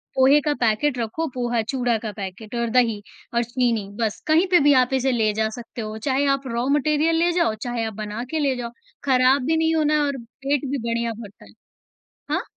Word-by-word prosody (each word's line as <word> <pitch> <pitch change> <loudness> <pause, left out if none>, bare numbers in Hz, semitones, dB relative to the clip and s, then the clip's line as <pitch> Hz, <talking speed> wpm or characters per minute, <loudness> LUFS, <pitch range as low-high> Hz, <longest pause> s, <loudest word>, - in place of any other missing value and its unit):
पोहे 270 +3 +5
का 295 0 0
पैकेट 240 +4 +1
रखो 240 +8 -2
पोहा, 240 -2 0
चूड़ा 245 0 0
का 215 - -3
पैकेट 205 +3 -7
और 235 0 -1
दही 230 -3 +2 0.3
और 235 0 +2
चीनी 235 -4 -1
बस, 220 -2 -1
कहीं 320 +4 +4
पे 355 - +7
भी 290 0 +6
आप 250 +2 -5
इसे 265 0 +1
ले 220 -3 +2
जा 220 +1 0
सकते 235 0 -8
हो, 215 0 -5
चाहे 270 +4 0
आप 275 -1 -9
रॉ 235 +1 -2
मटीरियल 305 +3 +1
ले 340 +1 +2
जाओ, 340 -11 +1
चाहे 240 -2 -2
आप 220 - -4
बना 210 +3 -5
के 320 - -1
ले 275 -3 +1
जाओ, 235 -1 -5 0.3
खराब 260 0 +4
भी 320 +1 +2
नहीं 320 0 +2
होना 305 -1 +2
है 300 - +3
और 280 -1 -2
पेट 275 +4 -3
भी 280 - 0
बढ़िया 235 0 -1
भरता 205 - -12
है। 100 - -17 0.8
हाँ? - - 0
245 Hz, 220 wpm, -23 LUFS, 225-285 Hz, 0.8 s, पे